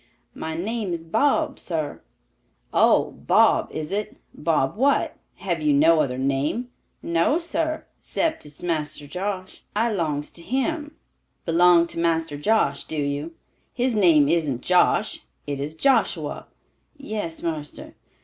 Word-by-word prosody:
"My 160 Hz, 0 st, -5 dB
name 210 Hz, +1 st, -2 dB
is 165 Hz, -1 st, -4 dB
Bob, 225 Hz, -, +1 dB
sar." 155 Hz, -4 st, -4 dB, 0.7 s
"Oh, -, -, +4 dB
Bob -, -, +3 dB
is 155 Hz, +1 st, -5 dB
it? 210 Hz, +2 st, -3 dB, 0.2 s
Bob 150 Hz, -2 st, 0 dB
what? 275 Hz, +5 st, +2 dB, 0.2 s
Have 175 Hz, -4 st, -3 dB
you 150 Hz, -1 st, +3 dB
no 160 Hz, +3 st, +5 dB
other 125 Hz, -4 st, -1 dB
name?" 140 Hz, -, -1 dB, 0.3 s
"No, 170 Hz, -, +2 dB
sar, 325 Hz, -2 st, -2 dB
'cept 320 Hz, -1 st, -1 dB
it's 150 Hz, +2 st, -10 dB
Marster 155 Hz, -4 st, -2 dB
Josh. 185 Hz, +4 st, -5 dB
I 230 Hz, +2 st, +2 dB
'longs 155 Hz, -7 st, -2 dB
to 170 Hz, -, -12 dB
him." 295 Hz, -, -2 dB, 0.5 s
"Belong 170 Hz, 0 st, +5 dB
to 170 Hz, -, -6 dB
Master 165 Hz, -2 st, 0 dB
Josh, 215 Hz, +10 st, +1 dB
do 160 Hz, -, -5 dB
you? 145 Hz, +3 st, -2 dB, 0.4 s
His 250 Hz, -1 st, +1 dB
name 165 Hz, -8 st, +5 dB
isn't 150 Hz, -6 st, 0 dB
Josh, 180 Hz, +4 st, +2 dB, 0.3 s
it 140 Hz, -1 st, -4 dB
is 145 Hz, +3 st, -4 dB
Joshua." 270 Hz, +11 st, +1 dB, 0.5 s
"Yes, 215 Hz, -11 st, -5 dB
marster." 155 Hz, -3 st, -5 dB
170 Hz, 135 wpm, -24 LUFS, 150-215 Hz, 0.7 s, no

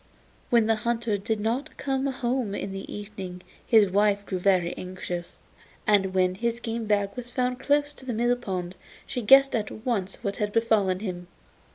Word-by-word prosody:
When 235 Hz, -3 st, +4 dB
the 225 Hz, 0 st, +2 dB
hunter 235 Hz, -1 st, 0 dB
did 215 Hz, +2 st, -2 dB
not 235 Hz, +6 st, -2 dB
come 270 Hz, 0 st, -1 dB
home 250 Hz, -5 st, -1 dB
in 195 Hz, -, -4 dB
the 195 Hz, 0 st, -7 dB
evening 195 Hz, -3 st, -7 dB, 0.2 s
his 220 Hz, -3 st, +6 dB
wife 205 Hz, 0 st, +2 dB
grew 185 Hz, -2 st, -3 dB
very 180 Hz, -2 st, +2 dB
anxious, 180 Hz, -1 st, -6 dB, 0.5 s
and 195 Hz, -3 st, +3 dB
when 185 Hz, -1 st, +3 dB
his 235 Hz, +4 st, -2 dB
game 230 Hz, -1 st, -3 dB
bag 205 Hz, -1 st, +1 dB
was 245 Hz, -1 st, -6 dB
found 250 Hz, 0 st, -1 dB
close 290 Hz, +1 st, +1 dB
to 265 Hz, -, -13 dB
the 245 Hz, -, -1 dB
mill 240 Hz, +2 st, +2 dB
pond 185 Hz, -7 st, -4 dB, 0.3 s
she 255 Hz, -3 st, -3 dB
guessed 270 Hz, +5 st, +7 dB
at 215 Hz, -2 st, -1 dB, 0.2 s
once 200 Hz, -6 st, -1 dB
what 200 Hz, -2 st, -2 dB
had 210 Hz, -1 st, -1 dB
befallen 210 Hz, -5 st, +2 dB
him. 180 Hz, -4 st, -5 dB
215 Hz, 180 wpm, -26 LUFS, 195-240 Hz, 0.5 s, guessed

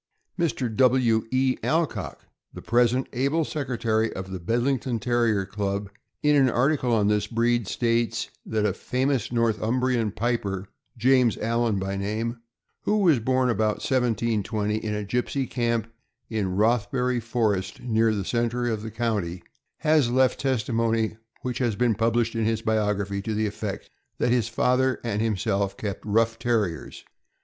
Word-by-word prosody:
Mr. 130 Hz, -9 st, -1 dB
W. 125 Hz, -4 st, +3 dB
E. 130 Hz, +1 st, +1 dB
Alcock, 160 Hz, 0 st, -1 dB, 0.3 s
the -, -, -9 dB
present 120 Hz, +2 st, +2 dB
able 140 Hz, +6 st, +1 dB
secretary 115 Hz, -7 st, -1 dB
of 95 Hz, 0 st, -6 dB
the 95 Hz, -, -4 dB
Bed 115 Hz, +8 st, 0 dB
lington 130 Hz, -3 st, 0 dB
Terrier 115 Hz, -3 st, +1 dB
Club, 100 Hz, 0 st, -3 dB, 0.3 s
in 150 Hz, 0 st, +4 dB
an 135 Hz, -2 st, +5 dB
article 130 Hz, +1 st, +1 dB
on 105 Hz, -3 st, +3 dB
this 105 Hz, 0 st, +1 dB
breed, 120 Hz, -2 st, +1 dB
states 115 Hz, -1 st, 0 dB
that 110 Hz, -1 st, -1 dB
a 100 Hz, -, +1 dB
famous 130 Hz, +2 st, -1 dB
Northumbrian 115 Hz, 0 st, +1 dB
piper, 100 Hz, -4 st, -2 dB, 0.3 s
James 125 Hz, 0 st, +3 dB
Allan 115 Hz, -1 st, 0 dB
by 95 Hz, +1 st, -2 dB
name, 110 Hz, +4 st, -3 dB, 0.4 s
who 210 Hz, -, +1 dB
was 170 Hz, -, +4 dB
born 130 Hz, +2 st, +1 dB
about 110 Hz, -1 st, +1 dB
1720. 110 Hz, -4 st, 0 dB
in 110 Hz, -1 st, -3 dB
a 105 Hz, 0 st, -3 dB
gypsy 125 Hz, +5 st, -1 dB
camp 115 Hz, -3 st, 0 dB, 0.5 s
in 100 Hz, -5 st, -1 dB
Rothbury 120 Hz, +4 st, +1 dB
Forest, 110 Hz, -5 st, -1 dB
near 115 Hz, -2 st, +2 dB
the 100 Hz, -3 st, -3 dB
center 120 Hz, +1 st, 0 dB
of 110 Hz, -2 st, -2 dB
the 110 Hz, -, -5 dB
county, 105 Hz, -6 st, -2 dB, 0.3 s
has 155 Hz, -5 st, +3 dB
left 130 Hz, +1 st, +2 dB
testimony, 115 Hz, -3 st, 0 dB, 0.3 s
which 125 Hz, -1 st, -3 dB
has 120 Hz, -5 st, 0 dB
been 120 Hz, +1 st, +2 dB
published 115 Hz, +2 st, +1 dB
in 115 Hz, -1 st, 0 dB
his 115 Hz, 0 st, 0 dB
biography, 105 Hz, -2 st, 0 dB
to 110 Hz, +1 st, -3 dB
the 110 Hz, +1 st, +1 dB
effect 105 Hz, -, -5 dB, 0.3 s
that 120 Hz, -, +1 dB
his 120 Hz, -2 st, +2 dB
father 125 Hz, +2 st, +2 dB
and 110 Hz, -3 st, -1 dB
himself 100 Hz, -2 st, 0 dB
kept 100 Hz, -3 st, -4 dB
rough 115 Hz, +2 st, +1 dB
Terriers. 110 Hz, -9 st, -2 dB
115 Hz, 150 wpm, -25 LUFS, 105-125 Hz, 0.5 s, an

